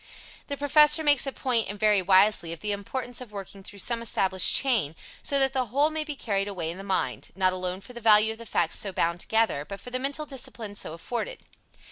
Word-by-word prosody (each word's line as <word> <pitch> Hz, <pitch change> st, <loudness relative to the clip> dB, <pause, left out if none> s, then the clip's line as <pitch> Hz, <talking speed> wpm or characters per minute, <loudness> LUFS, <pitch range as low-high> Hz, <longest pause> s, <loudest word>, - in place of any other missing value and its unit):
The 280 Hz, -, -4 dB
Professor 300 Hz, +2 st, +5 dB
makes 290 Hz, -2 st, +3 dB
a -, -, -1 dB
point, 245 Hz, -5 st, 0 dB
and 205 Hz, 0 st, -6 dB
very 210 Hz, -2 st, +4 dB
wisely, 190 Hz, -2 st, +4 dB
of 165 Hz, -, -7 dB
the 210 Hz, -, -2 dB
importance 240 Hz, +5 st, -4 dB
of 245 Hz, -4 st, -9 dB
working 195 Hz, -1 st, -8 dB
through 200 Hz, +1 st, -12 dB
some 230 Hz, +4 st, -1 dB
established 190 Hz, -4 st, +1 dB
chain, 225 Hz, -, +1 dB, 0.3 s
so 280 Hz, -, 0 dB
that 270 Hz, -1 st, +4 dB
the 260 Hz, -2 st, 0 dB
whole 285 Hz, +7 st, +2 dB
may 310 Hz, 0 st, -2 dB
be 300 Hz, -1 st, -6 dB
carried 200 Hz, -6 st, -1 dB
away 175 Hz, -5 st, -4 dB
in 180 Hz, -, -9 dB
the -, -, -7 dB
mind 195 Hz, -1 st, -2 dB
not 185 Hz, -1 st, +2 dB
alone 185 Hz, +1 st, -3 dB
for 250 Hz, -, -12 dB
the 235 Hz, -, -8 dB
value 215 Hz, 0 st, +6 dB
of 225 Hz, -, -9 dB
the 230 Hz, -, -9 dB
facts -, -, 0 dB
so 200 Hz, -, -3 dB
bound 170 Hz, -1 st, 0 dB
together, 220 Hz, -9 st, +1 dB
but 200 Hz, +6 st, -8 dB
for 250 Hz, -, -10 dB
the 255 Hz, -, -2 dB
mental 280 Hz, +3 st, -2 dB
discipline 240 Hz, -6 st, -6 dB
so 160 Hz, -, -6 dB
afforded. 245 Hz, -, -5 dB
215 Hz, 230 wpm, -26 LUFS, 195-265 Hz, 0.3 s, value